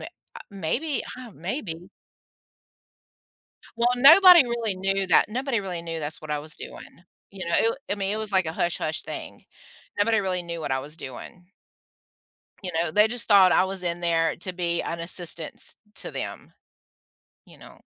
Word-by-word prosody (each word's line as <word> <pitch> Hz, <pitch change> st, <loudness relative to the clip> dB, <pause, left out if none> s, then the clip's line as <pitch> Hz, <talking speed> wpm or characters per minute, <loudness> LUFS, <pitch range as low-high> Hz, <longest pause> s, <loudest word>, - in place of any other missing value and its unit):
may -, -, -7 dB, 0.3 s
uh, -, -, -11 dB
maybe, 235 Hz, -, -2 dB
I -, -, -9 dB
ha 245 Hz, -, -11 dB
maybe 175 Hz, -, -6 dB, 1.9 s
Well, 235 Hz, +1 st, +3 dB
nobody 340 Hz, +4 st, +8 dB
really 235 Hz, -5 st, -2 dB
knew 195 Hz, 0 st, 0 dB
that. -, -, +4 dB
Nobody 250 Hz, 0 st, -2 dB
really 180 Hz, -3 st, -5 dB
knew 165 Hz, -1 st, -5 dB
that's 150 Hz, 0 st, -2 dB
what 155 Hz, -, -8 dB
I 150 Hz, -, -1 dB
was 150 Hz, +1 st, -6 dB
doing. 170 Hz, -, -11 dB, 0.3 s
You 195 Hz, -2 st, -7 dB
know, 170 Hz, -, -1 dB
it -, -, +4 dB
w 230 Hz, -, +2 dB, 0.2 s
I -, -, +2 dB
mean, 195 Hz, 0 st, -1 dB
it -, -, -1 dB
was 220 Hz, -1 st, -2 dB
like 190 Hz, -3 st, +1 dB
a 160 Hz, -, -3 dB
hush-hush 165 Hz, -2 st, -2 dB
thing. -, -, -8 dB, 0.6 s
Nobody 220 Hz, +1 st, +3 dB
really 185 Hz, -2 st, -1 dB
knew 170 Hz, -1 st, -6 dB
what 145 Hz, -, -4 dB
I 130 Hz, -, 0 dB
was 150 Hz, +4 st, -9 dB
doing. 165 Hz, +6 st, -10 dB, 1.2 s
You 180 Hz, -, -3 dB
know, 165 Hz, 0 st, 0 dB
they 210 Hz, +5 st, +4 dB
just 245 Hz, +1 st, -1 dB
thought 195 Hz, -4 st, +6 dB
I -, -, +4 dB
was 190 Hz, -1 st, -2 dB
in 170 Hz, 0 st, -2 dB
there 165 Hz, -1 st, +1 dB
to 185 Hz, +1 st, -4 dB
be 170 Hz, -1 st, -2 dB
an 170 Hz, -, -5 dB
assistance 170 Hz, -2 st, +1 dB, 0.2 s
to -, -, -3 dB
them, -, -, -7 dB, 0.9 s
you -, -, -17 dB
know? -, -, -16 dB
185 Hz, 185 wpm, -25 LUFS, 165-215 Hz, 1.9 s, nobody